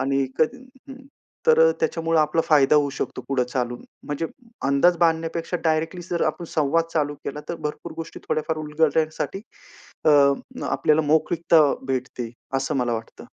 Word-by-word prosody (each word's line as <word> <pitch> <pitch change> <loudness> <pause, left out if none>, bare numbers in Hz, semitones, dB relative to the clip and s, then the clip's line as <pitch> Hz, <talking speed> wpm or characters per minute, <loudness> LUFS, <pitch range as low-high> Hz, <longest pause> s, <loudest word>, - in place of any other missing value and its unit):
आणि 135 0 +1
कधी 255 +12 0 0.2
हं 270 0 -11 0.4
तर 475 0 +6
अ, - - +4
त्याच्यामुळे 165 - +1
आपला 155 +2 +2
फायदा 150 -1 +5
होऊ 145 -1 +2
शकतो - - -4
पुढे 135 -2 +1
चालून. 125 -1 -3 0.2
म्हणजे 145 +3 -2 0.4
अंदाज 140 +6 +4
बांधण्यापेक्षा 165 +1 0
डायरेक्टली 160 +3 0
जर 170 - 0
आपण 155 +3 -3
संवाद 160 +2 +2
चालू 145 -2 0
केला, 150 +2 -4
तर 170 - -2
भरपूर 150 -1 -5
गोष्टी 165 - -7
थोड्याफार 155 0 -1
उलगडण्यासाठी, 155 +4 0 0.6
अ, 155 - +5 0.6
आपल्याला 155 +1 +2
मोकळीकता 160 +1 +3 0.3
भेटते 125 -2 -3 0.3
असं 135 +1 -1
मला 120 -2 0
वाटतं. 110 0 -8
155 Hz, 150 wpm, -23 LUFS, 140-165 Hz, 0.6 s, तर